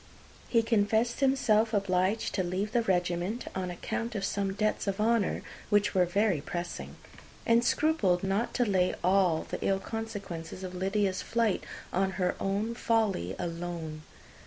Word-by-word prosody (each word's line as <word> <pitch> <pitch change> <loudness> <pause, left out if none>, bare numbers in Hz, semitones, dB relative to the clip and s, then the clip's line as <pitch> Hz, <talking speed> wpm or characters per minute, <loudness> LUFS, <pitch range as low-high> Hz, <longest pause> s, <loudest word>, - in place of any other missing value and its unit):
He 230 -2 +3
confessed 225 +1 +2
himself 230 -5 +3
obliged 195 +2 +1
to 185 - +1
leave 185 +4 -2
the 235 - +3
regiment 180 +2 0
on 185 -1 -3
account 225 +6 -4
of 195 -1 -1
some 195 -1 -1
debts 215 +1 0
of 195 +1 -1
honour 225 -2 +1 0.3
which 205 -1 +3
were 180 -2 +3
very 195 -3 +2
pressing; 175 +3 -5 0.5
and 230 0 +4
scrupled 225 - +2
not 195 +5 0
to 245 - +3
lay 185 -4 +2
all 180 -3 +3
the - - -5
ill 195 -1 +2
consequences 195 -6 -6
of 185 -1 -5
Lydia's 190 +1 0
flight 230 -4 0 0.3
on 190 +1 +1
her 180 -1 0
own 205 +4 -1
folly 220 - 0
alone. 170 -2 -4
195 Hz, 150 wpm, -30 LUFS, 180-225 Hz, 0.5 s, and